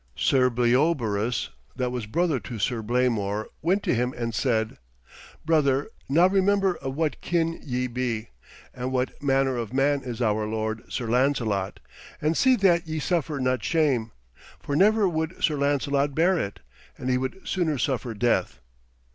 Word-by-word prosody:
Sir 130 -2 +3
Bleobaris, 120 -3 +1 0.3
that 125 -1 -1
was 120 -4 -4
brother 160 +2 +1
to 110 +3 -7
Sir 115 +2 -1
Blamor, 110 -3 0 0.2
went 185 +5 +1
to - - +1
him 125 +1 0
and 115 -1 -3
said: 110 -3 0 0.7
'Brother, 150 +1 +2 0.2
now 165 +6 +5
remember 195 0 +3
of 135 -1 -5
what 155 -2 -1
kin 165 -1 0
ye 125 -2 -2
be, 120 -3 -3 0.4
and 125 +1 -4
what 130 0 -2
manner 135 -2 +2
of 115 0 -4
man 140 +1 +2
is 120 -3 -6
our 110 -2 +1
lord, 110 0 -3
Sir 120 - -3
Lancelot, 115 -6 0 0.4
and 155 +2 +1
see 260 +6 +4
that 175 -6 +3
ye 160 0 -3
suffer 155 -2 -1
not 130 -3 0
shame. 130 -6 +1 0.5
For 140 - -3
never 210 +4 +4
would 160 0 -3
Sir 155 - +3
Lancelot 140 0 0
bear 175 +4 +3
it, 100 - -4 0.4
and 125 - -6
he 125 - +2
would 130 +8 -4
sooner 165 -6 0
suffer 125 -3 -2
death.' 120 +3 0
130 Hz, 160 wpm, -25 LUFS, 120-160 Hz, 0.7 s, now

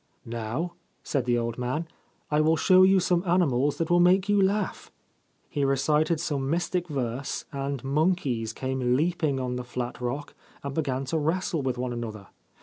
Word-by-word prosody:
' - - -44
Now,' 120 +9 -3 0.3
said 135 -4 -1
the 120 -1 +2
old 115 0 -2
man, 130 +7 -2 0.2
< - - -39
I 150 +1 +3
will 160 +1 +3
show 185 +2 +5
you 190 +1 +6
some 175 -1 +1
animals 145 -7 +2
that 165 0 -1
will 175 - +5
make 185 +2 +4
you 205 -1 +3
laugh/ 200 +1 0 0.6
He 145 - -2
recited 150 +4 +2
some 140 -4 -2
mystic 175 +2 0
verse, 130 -3 -3
and 140 -2 -3
monkeys 140 -6 0
came 130 0 -1
leaping 155 -2 +1
on 125 -1 -2
the 125 - -4
flat 120 0 -5
rock 130 +4 -3 0.3
and 140 -1 -4
began 135 -3 -1
to 160 +4 -1
wrestle 165 +1 0
with 130 -2 -1
one 125 0 -2
another. 110 -4 -6
140 Hz, 180 wpm, -27 LUFS, 125-170 Hz, 0.6 s, you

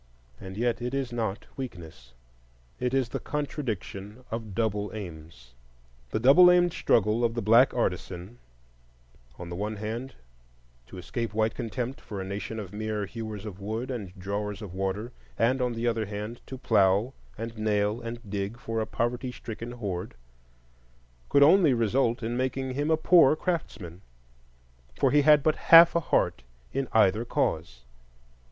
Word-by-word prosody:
And 95 0 -9
yet 120 +1 0
it 125 +2 -3
is 135 -3 -2
not 110 -3 -3
weakness,—it - - -9
is 130 -2 +1
the - - -4
contradiction 125 - -5
of 110 -4 -5
double 105 -2 -1
aims. 80 - -10 0.6
The - - -1
double 140 +10 +7
aimed 175 -1 +4
struggle 110 +2 +2
of 115 0 +1
the 120 - -1
black 115 +5 +6
artisan—on - - -7
the 85 - -5
one 105 +4 -3
hand 115 +5 -5 0.7
to 95 - -11
escape 110 +4 -4
white 110 0 +1
contempt 125 +2 -4
for 100 - -7
a - - -3
nation 100 +3 -5
of 100 -2 -8
mere 105 -1 -3
hewers 110 0 -7
of 100 -3 -8
wood 110 +6 -4
and 105 -8 -5
drawers 100 +2 -4
of 95 -4 -8
water, 95 +5 -3 0.3
and 125 +3 +2
on 125 -1 0
the 115 +1 -3
other 115 -3 0
hand 105 +3 -6
to 130 - -7
plough 105 0 +2 0.2
and 115 +1 -6
nail 105 +1 0
and 115 -1 -7
dig 100 +3 -3
for 115 -2 -4
a 110 - -3
poverty 125 +2 -2
stricken 115 0 -7
horde—could - - -4
only 160 -3 +6
result 120 +2 +1
in 115 +2 -2
making 130 +1 -2
him 145 +3 -1
a 160 - +3
poor 160 -3 +6
craftsman, 100 - -4 0.9
for - - +2
he 150 - +5
had 150 -1 +6
but 155 0 +2
half 170 +1 +9
a - - +4
heart 165 - 0 0.3
in 135 -1 -1
either 110 0 +3
cause. 80 - -2
110 Hz, 155 wpm, -27 LUFS, 95-125 Hz, 0.9 s, half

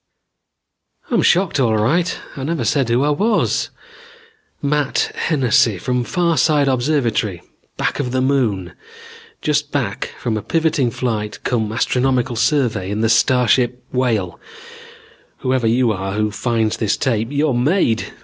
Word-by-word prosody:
"I'm 235 - +3
shocked 175 -5 +2
all 115 -4 +2
right. 160 +12 +1 0.2
I 135 - -6
never 165 +3 -2
said 140 -5 +1
who 120 +3 +2
I 150 - +2
was. 210 +9 +1 0.9
Matt 145 -1 0
Hennessy, 125 - +2
from 125 +6 -1
Farside 160 -4 +2
Observatory, 120 - 0 0.3
back - - -1
of 125 -4 -2
the 130 - 0
Moon, 115 -10 0 0.7
just 150 -1 0
back 120 -9 -2
from 115 -3 -2
a - - -3
proving 160 -2 +1
flight 110 -3 -3
cum 110 -4 -1
astronomical 125 +1 0
survey 115 -7 0
in 105 +2 -2
the 115 - +2
starship 125 +1 +2
Whale. 115 -8 -1 1.0
Whoever 130 -2 0
you 120 +1 +2
are 95 -1 -3
who 105 +1 0
finds 110 +1 -1
this 105 -3 0
tape, 115 -5 0
you're 145 0 +1
made. 120 - +1
125 Hz, 135 wpm, -19 LUFS, 110-145 Hz, 1.0 s, I'm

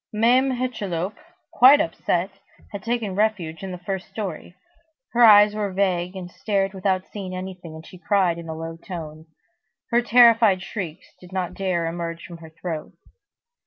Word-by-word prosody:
Mame 245 +5 +3
Hucheloup, 210 -7 -3 0.4
quite 270 +4 +7
upset, 175 +3 -1 0.4
had 200 - -6
taken 230 -2 -2
refuge 190 -6 -1
in 190 -1 -6
the 180 - -6
first 190 +2 -5
story. 190 -4 -6 0.6
Her 240 0 +3
eyes 210 -2 +8
were 210 -2 -2
vague, 185 -1 0
and 180 -1 -7
stared 195 -1 -1
without 190 -1 -1
seeing 190 -3 -6
anything, 185 -3 -8
and 160 0 -11
she 185 - -13
cried 185 -4 +1
in 165 -1 -9
a 160 - -4
low 165 +1 -6
tone. 160 -3 -8 0.6
Her 240 +1 +4
terrified 230 -5 +5
shrieks 180 -5 -7
did 180 0 -15
not 185 -1 -3
dare 185 -3 -1
to 165 - -1
emerge 170 0 -5
from 170 - -10
her 165 -1 -12
throat. 160 0 -6
185 Hz, 165 wpm, -23 LUFS, 170-210 Hz, 0.6 s, eyes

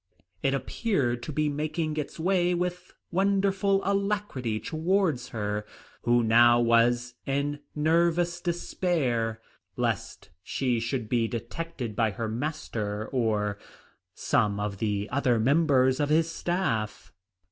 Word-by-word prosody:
It 135 0 +2
appeared 135 - -1
to 155 - -5
be 150 +1 0
making 155 +2 -2
its 150 +2 -4
way 180 0 +2
with 180 +1 -3 0.2
wonderful 195 +1 +2
alacrity 200 - -1
towards 160 - 0
her, 105 -1 -2 0.4
who 120 0 +3
now 120 +1 +6
was 120 +1 +3
in 140 +1 -1 0.2
nervous 170 +3 +2
despair 145 -10 -1 0.4
lest - - -2
she 125 +4 -1
should 120 0 -2
be 115 -1 +1
detected 120 0 -5
by 115 0 +2
her 110 +2 -4
master, 110 -5 -3
or 105 -5 0 0.6
some 105 -1 +1
of 105 -1 -3
the 105 -2 -1
other 125 -3 +2
members 130 0 +3
of 145 -1 +1
his 160 +2 +3
staff. 115 - -2
135 Hz, 120 wpm, -27 LUFS, 115-170 Hz, 0.6 s, now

